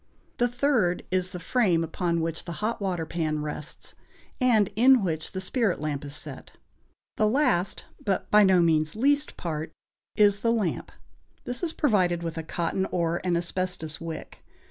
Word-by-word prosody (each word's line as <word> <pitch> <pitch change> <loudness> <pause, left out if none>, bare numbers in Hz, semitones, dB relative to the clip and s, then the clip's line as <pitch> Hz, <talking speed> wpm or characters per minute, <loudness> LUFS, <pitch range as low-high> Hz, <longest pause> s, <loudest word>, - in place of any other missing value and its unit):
The 245 - +4
third 245 -8 +1
is 185 0 +1
the 180 -1 -7
frame 180 -3 +2
upon 170 +1 -1
which 165 0 -3
the 170 - -5
hot 215 +4 -3
water 180 -4 -1
pan 155 -2 -2
rests, 150 0 -6 0.5
and 230 -6 +4
in 250 +1 +6
which 160 -3 -2
the 190 - -3
spirit 200 0 0
lamp 145 -2 -3
is 145 0 -6
set. - - -9 0.6
The 215 - +3
last, 210 -7 +1 0.2
but 195 -3 -1
by 210 0 +7
no 185 -3 +5
means 155 -1 +2
least, 285 +5 +1
part 160 -2 -4 0.4
is 205 -2 +4
the 230 +1 +1
lamp; 215 -7 -1 0.5
this 245 - -3
is 345 -3 0
provided 185 - +1
with 165 -1 -4
a - - -2
cotton 170 +4 -2
or 170 -1 -1
an 180 -2 +1
asbestos 175 -3 -3
wick. 165 -1 -7
180 Hz, 165 wpm, -26 LUFS, 165-215 Hz, 0.6 s, by